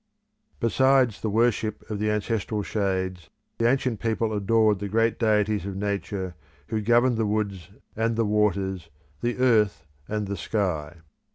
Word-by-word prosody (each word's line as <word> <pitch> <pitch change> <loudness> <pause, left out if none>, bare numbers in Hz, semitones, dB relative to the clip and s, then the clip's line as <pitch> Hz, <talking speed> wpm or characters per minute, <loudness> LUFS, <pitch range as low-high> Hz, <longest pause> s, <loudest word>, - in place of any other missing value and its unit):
Besides 130 0 +3
the 110 - -1
worship 110 0 0
of 105 -2 -4
the 105 0 0
ancestral 105 0 -1
shades 95 -4 -2 0.3
the 115 0 +4
ancient 130 -4 0
people 115 -1 -1
adored 105 0 +2
the 100 0 -4
great 115 +2 +1
deities 105 -3 +2
of 100 0 -5
nature 100 -2 -3 0.4
who 110 -2 -1
governed 120 +2 +3
the 110 -1 +1
woods 100 -5 -2 0.3
and 115 +1 0
the 115 0 +1
waters, 100 -4 0 0.3
the 120 0 -1
earth 110 -9 +2 0.2
and 105 -1 -2
the 100 0 -4
sky. 85 -4 -2
105 Hz, 150 wpm, -25 LUFS, 100-115 Hz, 0.4 s, the